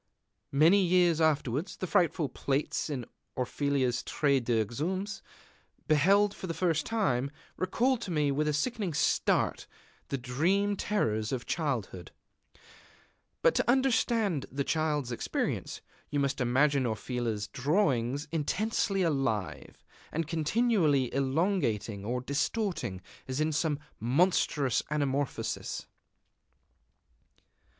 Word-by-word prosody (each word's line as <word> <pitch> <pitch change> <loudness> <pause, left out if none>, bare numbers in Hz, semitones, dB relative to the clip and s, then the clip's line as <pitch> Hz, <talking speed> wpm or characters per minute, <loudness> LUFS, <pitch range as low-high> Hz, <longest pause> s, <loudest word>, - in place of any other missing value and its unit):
Many 165 +8 +5
years 175 -2 +3
afterwards, 150 0 0
the - - -3
frightful 175 -5 +2
plates 135 +4 -2
in 130 -5 -3 0.3
Orfila's 130 -1 0
Traité 140 -4 +1
des 115 -2 +1
Exhumés, 185 - -3 0.7
beheld 195 +7 +4
for 190 - -7
the 165 - -3
first 165 -4 0
time, 140 - 0 0.3
recalled 240 +7 +1
to 200 - -5
me 150 -4 +1
with 150 +2 0
a - - +2
sickening 190 - -1
start - - +1 0.4
the 140 - -2
dream 175 +12 +1
terrors 110 - -1
of 130 -2 -3
childhood. 125 - -3 1.3
But - - +5
to - - 0
understand 230 - +2
the 140 +2 -1
Child's 150 -4 0
experience, 120 - -3 0.3
you 145 - -1
must 140 -1 0
imagine 130 +2 +2
Orfila's 110 -1 -2
drawings 140 - 0
intensely 195 +5 0
alive, 115 - -2 0.3
and 165 +1 -1
continually 160 - +1
elongating 135 - 0
or 125 +3 -1
distorting, 140 - -2 0.3
as 130 +1 -3
in 155 +1 +1
some 155 -1 0 0.2
monstrous 140 - +2
anamorphosis. 145 -2 -2
150 Hz, 110 wpm, -30 LUFS, 130-180 Hz, 1.3 s, Many